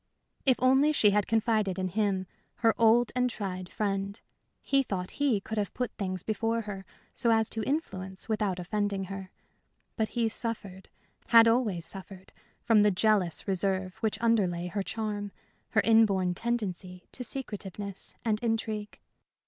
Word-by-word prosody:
If 260 - +6
only 265 +4 +4
she 210 -8 +5
had 205 0 +1
confided 215 -4 +1
in 185 -1 -1
him 195 -1 0 0.4
her 225 - +6
old 230 +1 +5
and 250 0 +2
tried 185 -5 -5
friend 200 -1 -2 0.4
he 275 0 +3
thought 185 -8 -4
he 265 -8 +3
could 220 +2 -4
have 200 -3 -3
put 250 -1 -2
things 185 -3 -4
before 225 +1 -1
her, 200 -3 -7 0.3
so 235 - 0
as 225 -1 +3
to 225 - 0
influence 190 -11 -3
without 210 -4 0
offending 200 +2 -1
her. 190 -1 -7 0.7
But 220 -1 0
he 230 -1 +3
suffered 215 -4 -4 0.4
had 230 0 +8
always 225 -8 +1
suffered 190 -1 -5 0.3
from 225 -2 +5
the 210 - +5
jealous 200 -3 +1
reserve 190 -1 0
which 220 -2 -1
underlay 185 -7 +1
her 200 +2 -2
charm, 205 -1 -3 0.4
her 220 - +3
inborn 200 -5 +4
tendency 185 -5 -3
to 250 - -7
secretiveness 205 -6 -5
and 215 -2 +1
intrigue. 220 -2 -2
210 Hz, 150 wpm, -29 LUFS, 190-225 Hz, 0.7 s, had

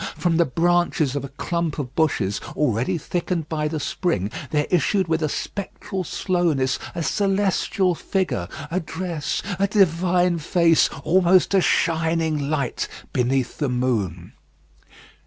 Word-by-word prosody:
From 170 -2 +1
the 170 - +4
branches 165 -2 +1
of 140 - -2
a 140 - -6
clump 165 +3 -2
of 135 -4 -4
bushes, 115 -11 0
already 135 - +1
thickened 170 -1 -2
by 150 -1 -1
the 155 0 -3
spring, 140 - -1 0.2
there 150 +1 +1
issued 185 +2 +2
with 160 0 0
a 155 - 0
spectral 195 +2 -4
slowness 165 -8 0 0.2
a 170 - -2
celestial 195 -1 +1
figure, 175 - -2 0.2
a 185 - +1
dress, 165 -2 -3 0.2
a 200 - +3
divine 180 -3 +2
face, 165 +1 +3
almost 180 +3 +4
a 195 - +5
shining 160 -4 +1
light 140 -5 -1 0.3
beneath 125 +1 0
the 145 -3 0
moon. 110 -9 -1
165 Hz, 135 wpm, -23 LUFS, 140-180 Hz, 0.3 s, a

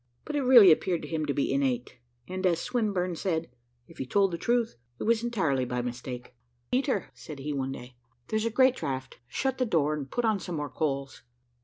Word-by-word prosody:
But 300 - -4
it 290 - +2
really 245 -8 +9
appeared 170 +2 +1
to - - -6
him 155 -2 -2
to 140 - +1
be 140 - +1
innate; 130 -3 -1 0.3
and, 185 0 -4
as 170 -2 +2
Swinburne 195 -7 -1
said, 165 -3 -2 0.4
"if 165 - -16
he - - -2
told 195 +2 +2
truth, 240 -1 +1 0.2
it - - -5
was 230 0 +2
entirely 165 - +1
by 125 0 -2
mistake." 125 0 -6 0.4
"Peter," 255 - 0
said 125 +5 -9
he, 145 +2 -4
one 135 -1 -2
day, 125 -2 -9 0.3
"there's 220 +1 0
a - - +1
great 260 +2 +4
draught. 135 - -4
Shut 265 - -2
the - - +3
door 155 -6 +2
and 145 -3 -4
put 245 -1 -1
on 215 -3 +2
some 175 -2 -5
more 145 -3 -3
coals." 140 -3 -2
165 Hz, 205 wpm, -28 LUFS, 135-220 Hz, 0.4 s, really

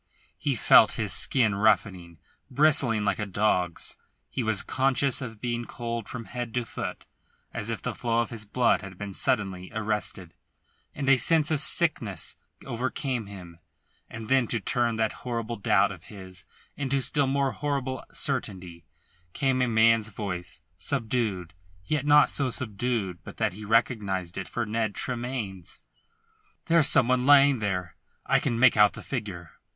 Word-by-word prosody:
He 140 +4 0
felt - - +6
his - - 0
skin 115 -6 +2
roughening, 95 -4 +1 0.3
bristling 130 -6 +3
like 100 - 0
a 105 - -2
dog's; 90 -3 0 0.3
he - - -2
was 110 -4 +1
conscious 135 +1 +1
of 115 -4 -7
being 120 +1 -3
cold 115 -2 -5
from 120 -2 -6
head 120 -1 -5
to 125 -1 -1
foot, - - -6 0.5
as 115 -1 -4
if 115 - -4
the - - -2
flow 115 -1 -1
of 115 - -4
his 115 -2 -5
blood 120 +3 +1
had 95 -2 -10
been 100 0 -6
suddenly 95 -7 0
arrested; 105 -5 -3 0.6
and 140 -2 -4
a 135 -1 +6
sense 155 +5 +2
of 155 - +2
sickness 120 - +1 0.3
overcame 125 -1 -3
him. 90 -4 -11 0.5
And 110 0 -8
then 130 -1 +3
to 115 - 0
turn 120 +2 0
that 110 -1 0
horrible 115 -1 -4
doubt 100 0 +2
of 90 -4 -11
his 95 -2 -9 0.3
into 140 -1 0
still 140 +1 +1
more 135 0 +1
horrible 135 -3 -3
certainty 95 - -3 0.5
came 135 -3 +1
a 125 - +2
man's 115 -1 +3
voice, 90 -6 -5 0.2
subdued, 110 - -2 0.3
yet 145 +8 -1
not 150 0 +6
so 140 -2 0
subdued 110 -5 -3
but - - -11
that - - 0
he 105 +3 -9
recognised 105 -6 0
it 95 - -6
for 120 - -3
Ned 110 -1 -2
Tremayne's. 120 -8 -5 0.9
"There's 165 -3 +4
some 120 - +5
one 125 0 +1
lying 140 -2 +6
there. 90 -4 -3 0.3
I - - +3
can 115 - -1
make 125 0 +5
out 105 -1 +5
the - - -9
figure." 100 -10 -5
115 Hz, 160 wpm, -27 LUFS, 100-130 Hz, 0.9 s, felt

